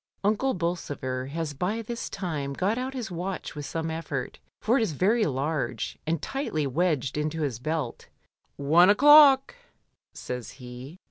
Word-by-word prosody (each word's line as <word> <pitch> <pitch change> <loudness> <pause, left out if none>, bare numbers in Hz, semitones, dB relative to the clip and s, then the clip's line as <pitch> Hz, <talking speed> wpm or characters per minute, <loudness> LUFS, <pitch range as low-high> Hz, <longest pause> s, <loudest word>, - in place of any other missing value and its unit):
Unde 215 +4 +1
Bolsover 145 -7 -3
has 155 +1 -4
by 195 +10 -2
this 235 +1 -5
time 155 -8 -3
got 190 +9 0
out 260 +2 -4
his 235 -6 -4
watch 180 +2 -4
with 145 -2 -6
some 160 +2 -3
effort, 155 -5 -4 0.2
for 225 +3 +2
it 255 - +3
is 215 -8 0
very 210 - +2
large, 140 -1 -2
and 165 0 0
tightly 270 - -2
wedged 145 -1 0
into 155 +1 -2
his 130 -6 -2
belt 155 -2 -3 0.5
"One 160 +6 +5
o'clock!" 280 +3 +7 0.6
says 125 -2 -6
he. 130 +5 -10
165 Hz, 150 wpm, -27 LUFS, 140-205 Hz, 0.6 s, o'clock